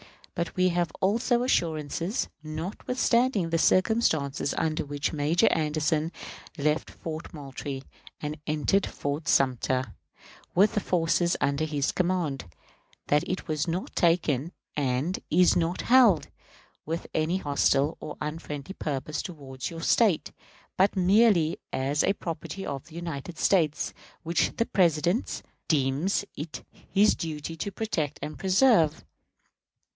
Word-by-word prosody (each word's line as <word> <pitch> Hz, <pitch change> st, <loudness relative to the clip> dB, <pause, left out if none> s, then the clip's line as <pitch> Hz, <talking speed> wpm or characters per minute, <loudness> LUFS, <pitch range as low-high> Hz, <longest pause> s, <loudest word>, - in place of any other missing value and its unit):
But 170 Hz, -2 st, -3 dB
we 185 Hz, 0 st, +3 dB
have 175 Hz, -1 st, 0 dB
also 235 Hz, +5 st, +2 dB
assurances, 170 Hz, -, 0 dB
notwithstanding 195 Hz, +5 st, 0 dB
the 165 Hz, -, +2 dB
circumstances 160 Hz, -10 st, +2 dB
under 155 Hz, -1 st, 0 dB
which 145 Hz, +1 st, -3 dB
Major 155 Hz, +3 st, +2 dB
Anderson 155 Hz, 0 st, 0 dB, 0.5 s
left 150 Hz, +2 st, 0 dB
Fort 160 Hz, 0 st, -7 dB
Moultrie 135 Hz, -1 st, -6 dB, 0.4 s
and 150 Hz, 0 st, -5 dB
entered 155 Hz, +6 st, +1 dB
Fort 145 Hz, +3 st, -4 dB
Sumter 130 Hz, -2 st, +1 dB, 0.6 s
with 200 Hz, +5 st, +5 dB
the 215 Hz, -, +2 dB
forces 170 Hz, -2 st, +1 dB
under 140 Hz, +2 st, +1 dB
his 145 Hz, -3 st, 0 dB
command, 170 Hz, -, -1 dB, 0.6 s
that 150 Hz, 0 st, +2 dB
it 185 Hz, -, -3 dB
was 155 Hz, 0 st, -1 dB
not 170 Hz, +3 st, -3 dB
taken, 165 Hz, -3 st, +2 dB, 0.2 s
and 140 Hz, +5 st, 0 dB
is 180 Hz, +2 st, +5 dB
not 170 Hz, +1 st, 0 dB
held, 235 Hz, -9 st, +5 dB, 0.5 s
with 165 Hz, +2 st, -4 dB
any 160 Hz, +4 st, +1 dB
hostile 145 Hz, -2 st, +2 dB
or 150 Hz, -, -7 dB
unfriendly 150 Hz, +1 st, -5 dB
purpose 150 Hz, -2 st, -3 dB
toward 135 Hz, -7 st, -7 dB
your 165 Hz, -1 st, -7 dB
State, 200 Hz, -1 st, +2 dB, 0.5 s
but 195 Hz, +3 st, +3 dB
merely 190 Hz, -3 st, +4 dB
as 140 Hz, +3 st, 0 dB, 0.2 s
property 170 Hz, +3 st, -5 dB
of 140 Hz, 0 st, -5 dB
the 165 Hz, -1 st, -15 dB
United 170 Hz, -1 st, -6 dB
States, 160 Hz, -6 st, +2 dB, 0.3 s
which 170 Hz, 0 st, 0 dB
the 230 Hz, -, +1 dB
President 175 Hz, -, +1 dB, 0.2 s
deems 150 Hz, +7 st, +1 dB
it 150 Hz, +2 st, -6 dB, 0.3 s
his 205 Hz, +2 st, +4 dB
duty 160 Hz, 0 st, -5 dB
to 180 Hz, +5 st, -4 dB
protect 165 Hz, -10 st, -2 dB
and 150 Hz, 0 st, -6 dB
preserve. 190 Hz, -, +3 dB
160 Hz, 125 wpm, -27 LUFS, 150-185 Hz, 0.6 s, with